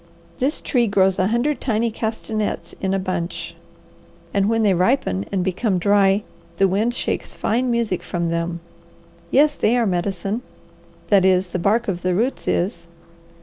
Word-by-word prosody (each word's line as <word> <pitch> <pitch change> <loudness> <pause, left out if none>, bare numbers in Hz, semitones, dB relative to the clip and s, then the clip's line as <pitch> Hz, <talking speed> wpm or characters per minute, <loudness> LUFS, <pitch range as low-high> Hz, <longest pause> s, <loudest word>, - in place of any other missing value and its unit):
This 280 +4 +1
tree 240 -3 +1
grows 190 -2 +2
a 185 - +3
hundred 240 +7 0
tiny 230 -1 0
castanets 220 -1 -3
in 190 - 0
a 195 - +1
bunch, 185 -2 -4 0.8
and 200 +1 +2
when 225 0 +2
they 200 -2 +4
ripen 180 - +1
and 190 -2 0
become 190 +2 0
dry 200 +2 +3 0.3
the 195 - +4
wind 215 +6 0
shakes - - -3
fine 245 +3 0
music 230 -6 0
from 170 -1 -2
them. 170 0 -2 0.7
Yes, 295 +2 +4
they 240 -3 +1
are 235 - +2
medicine; 195 +3 -1 0.7
that 200 -3 +5
is, 185 -1 +3
the 180 - -3
bark 220 +6 +1
of 180 -3 -2
the 180 0 0
roots 240 +7 -1
is. 170 -2 -1
200 Hz, 160 wpm, -21 LUFS, 185-230 Hz, 0.8 s, that